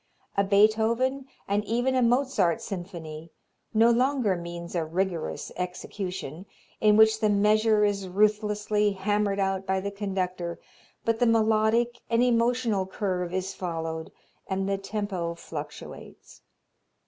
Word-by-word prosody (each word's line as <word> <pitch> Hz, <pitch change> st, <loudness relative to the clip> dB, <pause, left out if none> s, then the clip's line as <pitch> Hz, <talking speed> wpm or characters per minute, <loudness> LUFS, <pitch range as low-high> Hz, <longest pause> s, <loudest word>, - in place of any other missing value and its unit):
A 200 Hz, -, +3 dB
Beethoven, 220 Hz, +6 st, +2 dB, 0.2 s
and 205 Hz, +1 st, +1 dB
even 245 Hz, +4 st, 0 dB
a 255 Hz, -, +2 dB
Mozart 245 Hz, -5 st, +2 dB
symphony, 170 Hz, -6 st, -7 dB, 0.4 s
no 230 Hz, +1 st, +5 dB
longer 250 Hz, -4 st, +2 dB
means 170 Hz, 0 st, -7 dB
a 170 Hz, -2 st, 0 dB
rigorous 170 Hz, +1 st, -2 dB
execution, 180 Hz, -1 st, -5 dB, 0.3 s
in 210 Hz, -1 st, +5 dB
which 220 Hz, 0 st, +6 dB
the 215 Hz, -, +2 dB
measure 210 Hz, +1 st, +4 dB
is 200 Hz, -2 st, -1 dB
ruthlessly 210 Hz, +1 st, +1 dB
hammered 205 Hz, +1 st, 0 dB
out 195 Hz, 0 st, -1 dB
by 190 Hz, 0 st, +1 dB
the 200 Hz, +1 st, -4 dB
conductor, 185 Hz, -4 st, -3 dB, 0.5 s
but 230 Hz, 0 st, +1 dB
the 245 Hz, -, +4 dB
melodic 225 Hz, +1 st, +2 dB
and 230 Hz, +1 st, +3 dB
emotional 235 Hz, -4 st, +1 dB
curve 185 Hz, -3 st, -2 dB
is 185 Hz, +1 st, -2 dB
followed 165 Hz, -2 st, -4 dB, 0.4 s
and 190 Hz, 0 st, -1 dB
the 195 Hz, 0 st, 0 dB
tempo 195 Hz, -4 st, -3 dB
fluctuates. 150 Hz, -3 st, -9 dB
200 Hz, 125 wpm, -27 LUFS, 185-220 Hz, 0.5 s, which